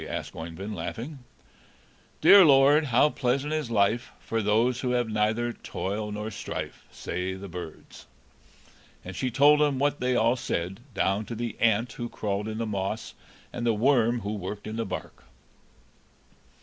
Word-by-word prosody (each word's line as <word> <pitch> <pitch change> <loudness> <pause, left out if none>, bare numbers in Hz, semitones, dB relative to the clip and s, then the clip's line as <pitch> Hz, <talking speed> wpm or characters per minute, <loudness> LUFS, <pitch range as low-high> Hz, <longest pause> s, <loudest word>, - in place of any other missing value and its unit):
asked - - -5
Oeyvind, 85 +6 -6
laughing. 115 - -6 1.0
"'Dear 200 -1 +9
Lord, 145 0 +6
how 135 +3 +3
pleasant 135 +3 -1
is 155 -5 -2
life, 115 +2 +1
For 115 0 -2
those 115 +4 +2
who 125 -2 -1
have 120 -1 +1
neither 110 +2 0
toil 105 +1 -4
nor 105 +1 -4
strife,' - - -6
say 90 +2 -4
the 100 +1 -8
birds." 85 -7 -10 1.0
And 90 0 -7
she 130 - -1
told 145 +4 +5
him 145 -3 +2
what 145 +2 +1
they 125 0 +1
all 115 +1 +3
said, 95 -6 -3 0.2
down 100 +3 +1
to 115 - -6
the 115 0 -4
ant 115 +1 +2
who 120 0 -5
crawled 105 0 -3
in 110 0 -4
the 115 - -2
moss, 105 +1 -3 0.4
and 120 - -4
the 115 -2 +2
worm 120 0 +3
who 105 +1 -3
worked 105 0 -6
in 110 - -5
the 115 -2 -2
bark. 90 - -7
115 Hz, 160 wpm, -27 LUFS, 100-125 Hz, 1.0 s, Dear